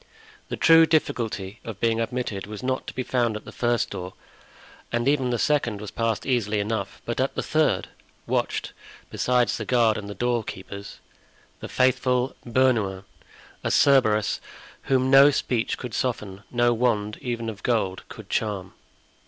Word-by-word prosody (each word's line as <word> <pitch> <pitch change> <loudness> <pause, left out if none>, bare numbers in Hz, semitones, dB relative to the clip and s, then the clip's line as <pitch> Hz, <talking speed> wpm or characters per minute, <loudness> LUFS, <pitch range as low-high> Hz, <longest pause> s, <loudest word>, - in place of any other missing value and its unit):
The - - -3
true 165 0 +7
difficulty 115 -10 -1
of 110 -3 -7
being 115 0 +1
admitted 115 -4 -3
was 105 +2 -8
not 130 0 -2
to - - -6
be 130 - -2
found 120 -4 0
at 105 - -12
the - - -9
first 120 -1 0
door, 90 +1 -6 0.8
and 120 +1 0
even 135 -3 +2
the 120 - 0
second 120 -5 +1
was 105 -1 -7
passed 115 -1 -1
easily 110 -5 +1
enough; 105 0 -3
but - - -3
at - - 0
the - - -2
third - - +1 0.4
watched, - - -1 0.4
besides 125 -3 +1
the 110 - -4
guard 115 -2 +2
and 100 -1 -8
the 105 - -6
doorkeepers, 100 -4 -3 0.6
the - - -7
faithful 130 0 +1
Bernouin, 115 -6 +1 0.6
a - - 0
Cerberus 110 -7 +3 0.4
whom 130 0 +2
no 135 +1 +9
speech 125 -4 -1
could 125 -3 -7
soften, 105 -6 -3
no 120 0 +2
wand, 110 -3 0
even 120 -2 -3
of 105 -3 -6
gold, 100 -6 0
could - - -10
charm. 100 -4 -2
115 Hz, 160 wpm, -25 LUFS, 105-125 Hz, 0.8 s, no